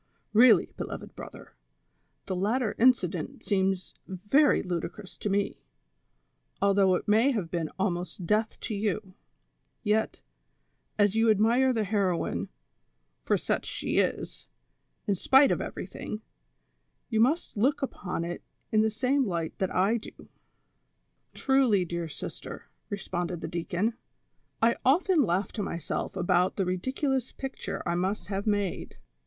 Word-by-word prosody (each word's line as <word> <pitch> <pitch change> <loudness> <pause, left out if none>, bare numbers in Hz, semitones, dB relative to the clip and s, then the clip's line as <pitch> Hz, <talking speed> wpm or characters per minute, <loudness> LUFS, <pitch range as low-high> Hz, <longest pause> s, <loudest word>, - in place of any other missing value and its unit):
Really, 225 -3 +6
beloved - - -6
brother, - - -10 0.7
the 185 - -3
latter 215 +5 0
incident 190 -10 +2
seems 190 -2 0
very 205 - +3
ludicrous 180 +3 -5
to 210 - -2
me, 200 0 -1 1.0
although 195 -2 +4
it - - -4
may 220 +6 +4
have 205 -11 -2
been 165 -3 -2
almost 180 -2 -2
death 215 +4 0
to 225 - -4
you; 205 -1 -2 0.7
yet, 220 0 0 0.7
as 205 -1 +3
you 225 0 +4
admire 230 +5 +4
the 225 -3 0
heroine, 195 -4 0 0.7
for - - +1
such - - -2
she - - -1
is, - - -2 0.6
in 200 - +2
spite 270 +9 +5
of - - 0
everything, 215 +1 -6 0.9
you 220 -3 +1
must 275 +9 +2
look 265 +7 +1
upon 180 -9 -3
it 175 +1 -5 0.3
in 215 -1 +4
the 220 - +3
same 255 +4 +1
light 170 -3 -2
that 190 - 0
I 195 +5 +2
do." 220 - -11 1.1
"Truly, 260 -9 +3
dear 170 0 -3
sister," 145 - -7 0.2
responded 175 -3 -3
the - - -4
deacon, 180 +6 -1 0.7
"I 235 +1 +4
often 330 +5 +4
laugh 190 -4 0
to 215 - -4
myself 170 -2 -3
about 180 0 +2
the 195 - 0
ridiculous 260 +8 -1
picture 270 0 -5
I 170 - 0
must 185 +5 -2
have 200 +1 -3
made. 205 -3 -1
205 Hz, 135 wpm, -28 LUFS, 185-230 Hz, 1.1 s, Really